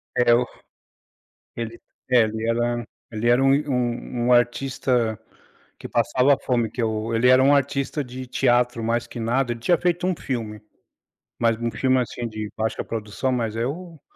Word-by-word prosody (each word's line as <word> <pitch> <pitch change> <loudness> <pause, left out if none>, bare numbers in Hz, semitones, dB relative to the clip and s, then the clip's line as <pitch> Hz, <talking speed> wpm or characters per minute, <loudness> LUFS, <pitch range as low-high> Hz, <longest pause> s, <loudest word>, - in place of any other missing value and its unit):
É 120 -1 +4
o 125 +1 +2 1.1
ele 115 0 -5 0.3
é, 125 -1 +6
ele 110 0 -2
era 120 0 0 0.3
ele 115 +1 -1
era 120 +2 +4
um 135 0 +5
i 150 +1 -1
um 120 -1 -2
um 125 - +4
artista 120 -2 +1 0.6
que - - -8
passava 125 +4 +2
fome, 120 -4 0
que 125 - -5
eu 110 +1 -1
ele 115 +2 +3
era 130 +1 +6
um 140 +2 +5
artista 140 +1 0
de 130 0 -8
teatro, 120 -1 +1
mais 115 +1 0
que 115 - -8
nada 120 +2 0
ele 115 - -7
tinha 175 +8 +3
feito 175 0 0
um 185 - 0
filme, 110 -7 -4 0.8
mas 115 -1 +2
um 115 0 -2
filme, 130 -1 +2
assim, 120 -1 -3
de 110 -1 -5
baixa 110 0 -2
produção, 115 +4 -3
mas 115 -3 -1
é 115 +1 -1
o 165 +2 -6
120 Hz, 180 wpm, -23 LUFS, 115-130 Hz, 1.1 s, é